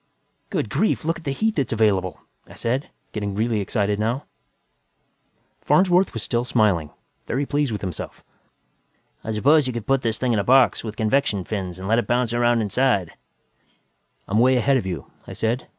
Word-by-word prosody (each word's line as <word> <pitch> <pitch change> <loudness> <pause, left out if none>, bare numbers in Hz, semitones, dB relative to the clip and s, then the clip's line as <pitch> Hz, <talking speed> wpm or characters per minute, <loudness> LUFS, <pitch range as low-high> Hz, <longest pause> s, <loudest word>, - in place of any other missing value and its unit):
"Good - - -3
Lord, 215 - +1
look 165 +1 -1
at - - -15
the 140 - -1
heat 220 +9 -1
that's 140 - 0
available!" 100 -5 +1 0.3
I - - -13
said, 125 +5 -2 0.2
getting 100 -2 -3
really 110 +1 0
excited 100 0 -1
now. 120 +6 -1 1.4
Farnsworth 185 -4 +3
was 115 - -3
still 120 0 0
smiling, 105 -11 +1 0.4
very 135 +4 -1
pleased 145 -2 0
with 105 - -4
himself. 90 -4 -6 1.0
"I 110 - -4
suppose 140 +7 +3
you 125 - -2
could 115 -3 -5
put 135 -1 +2
this 110 -3 -1
thing 125 -2 0
in 110 - +2
a - - 0
box, 130 +1 +4
with 110 -2 -6
convection 110 -3 +1
fins, 95 -3 -4
and 95 +1 -6
let 115 +3 +3
it - - -3
bounce 120 -1 +1
around 120 -1 +2
inside 105 -4 +1 0.6
" - - -43
"I'm 105 +3 +1
way 130 +2 +5
ahead 135 +3 +3
of 100 - -3
you," 85 -6 -5 0.2
I - - -7
said. 115 +3 -2
115 Hz, 185 wpm, -23 LUFS, 105-130 Hz, 1.4 s, way